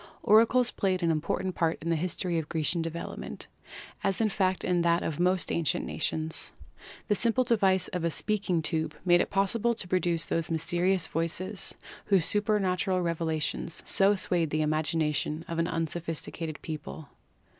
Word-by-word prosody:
Oracles 230 +3 +5
played 185 -2 0
an 165 - +3
important 165 +4 -1
part 165 -2 0
in 170 +2 -2
the - - +3
history 175 +1 -1
of 155 - -6
Gre 160 - -1
cian 170 +3 +1
development, 165 +1 -6 0.6
as 195 - +1
in 220 -1 +3
fact 190 -2 0
in 180 -1 +2
that 170 0 +2
of 155 -1 -3
most 180 +1 +2
ancient 170 -2 +1
nations. 160 0 -2 0.5
The 210 - +3
simple 235 +5 +2
device 195 -6 +2
of 180 -2 -3
a 170 - +2
speaking 190 -2 -1
tube 160 -1 -1
made 175 -1 +5
it - - -1
possible 215 +4 +1
to 210 - -6
produce 175 -2 +1
those 165 -1 -1
mysterious 175 +2 +1
voices 170 +5 -3 0.3
whose 190 -5 +3
super 210 +1 +1
n8 - - +4
PHYSICS 205 - +1
natural 185 0 +1
revelations 165 -1 -2
so 200 +1 +4
swayed 175 -4 0
the 155 +1 0
imagination 155 0 0
of 165 0 -3
an 165 - +2
un 165 -1 0
sophisticated 165 -1 -5
people. 155 -1 -7
170 Hz, 175 wpm, -29 LUFS, 160-190 Hz, 0.6 s, Oracles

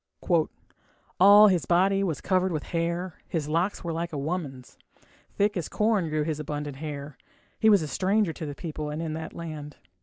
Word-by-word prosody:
All 205 +3 +9
his 180 -4 0
body 195 +3 +3
was 165 -7 -2
covered 185 0 +1
with 155 -3 -2
hair, 170 +1 -2
His 155 -4 -2
locks 170 +7 0
were 170 -1 -3
like 170 +1 -3
a 150 - -4
woman's, 140 -4 -5 0.6
Thick 205 +1 +1
as 175 -4 -3
corn 210 -6 +1
grew 155 0 0
his 155 -1 -3
abundant 145 -2 -5
hair. 145 -2 -7 0.4
He 220 - +5
was 200 -6 +5
a - - -3
stranger 195 +2 +1
to 155 - -6
the 145 - -6
people 155 -2 -5
and 150 +1 -4
in 165 -2 -3
that 160 +1 -6
land. 155 -3 -7
165 Hz, 185 wpm, -27 LUFS, 150-185 Hz, 0.6 s, All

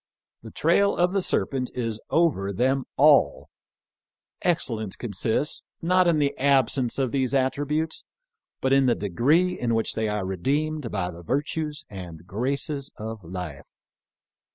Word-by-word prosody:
The - - -10
trail 200 0 +2
of 180 +1 +2
the 195 - +2
serpent 130 -7 -1
is 115 -3 -3
over 150 - +2
them 130 +6 +1
all! 140 - +4 0.9
Excel 155 -9 0
lence 110 -3 -5
consists, 115 - -1 0.2
not 180 +1 +3
in 170 -2 +3
the 145 -2 +1
absence 130 -2 +2
of 130 -3 0
these 130 -1 0
attri 135 +2 +1
butes, 155 +2 -1 0.6
but 130 0 +2
in 135 -1 +4
the 120 - +3
degree 145 - +2
in 115 -2 +1
which 115 - 0
they 110 -1 -1
are 105 -2 -2
redeemed 140 - -1
by 95 -4 -2
the 85 0 -11
virtues 150 - -2
and 90 -4 -9
graces 140 +7 -2
of 110 -1 -6
life. 85 -4 -7
130 Hz, 150 wpm, -25 LUFS, 105-150 Hz, 0.9 s, all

